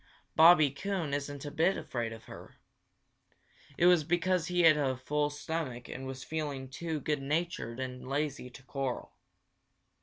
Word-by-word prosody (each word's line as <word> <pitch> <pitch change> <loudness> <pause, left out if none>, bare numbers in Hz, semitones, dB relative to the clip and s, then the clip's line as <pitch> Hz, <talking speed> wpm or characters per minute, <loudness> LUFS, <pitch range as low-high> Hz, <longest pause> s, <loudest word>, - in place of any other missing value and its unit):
Bobby 160 -3 +7
Coon 170 -1 -3
isn't 145 0 -3
a 145 - -5
bit 170 +6 +2
afraid 120 -7 -3
of 115 0 -9
her. - - -12 1.2
It 175 - +3
was 175 -3 +6
because 175 +1 +1
he 180 0 +2
had 160 -2 +7
a 135 -3 0
full 145 +3 0
stomach 145 -5 -4
and 130 +1 -6
was 130 -1 -6
feeling 145 -4 -4
too 160 +3 -3
good 145 0 -1
natured 145 -5 -2
and 125 -1 -5
lazy 140 -2 -2
to 125 - -14
quarrel. 135 -2 -4
145 Hz, 155 wpm, -31 LUFS, 130-165 Hz, 1.2 s, Bobby